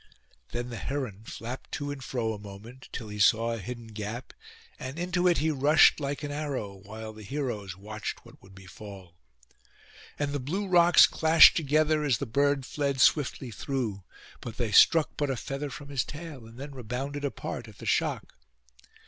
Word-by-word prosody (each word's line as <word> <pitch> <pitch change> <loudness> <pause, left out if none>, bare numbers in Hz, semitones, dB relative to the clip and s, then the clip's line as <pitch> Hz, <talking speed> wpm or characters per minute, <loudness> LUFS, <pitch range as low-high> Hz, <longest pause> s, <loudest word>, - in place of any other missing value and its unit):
Then 120 +1 -4
the 115 - -5
heron 120 -7 -4
flapped 120 +4 -7
to 145 0 -3
and 140 -2 -7
fro 115 -3 -2
a 105 - -7
moment, 105 +6 -11
till 110 -4 -6
he 105 0 -7
saw 115 +3 +4
a 115 - -4
hidden 120 +4 -7
gap, 110 +2 -6 0.5
and 130 +3 -6
into 180 +1 +1
it 175 - +4
he 160 +1 +1
rushed 150 +3 +5
like 140 +1 -3
an 145 - -3
arrow, 145 -9 -3
while 110 +3 -9
the 110 - -12
heroes 105 -6 -4
watched 110 +2 -6
what - - -16
would 95 0 -17
befall. 95 -1 -11 1.0
And 145 -1 -1
the 145 - -1
blue 180 +10 -3
rocks 175 -1 +7
clashed 160 0 +7
together 155 0 +2
as 135 -6 +2
the 140 - -3
bird 140 +2 +1
fled 140 -1 -2
swiftly 130 -2 +2
through; 115 -6 -3 0.4
but 115 -2 -8
they 120 -4 -1
struck 160 +9 +6
but 145 -1 0
a 135 - -1
feather 140 +4 -4
from 145 +1 -9
his 135 -3 0
tail, 150 -6 -9
and 115 +1 -14
then 140 +2 -7
rebounded 135 +4 -5
apart 140 - -4
at - - -14
the - - -10
shock. - - 0
130 Hz, 180 wpm, -28 LUFS, 110-145 Hz, 1.0 s, rocks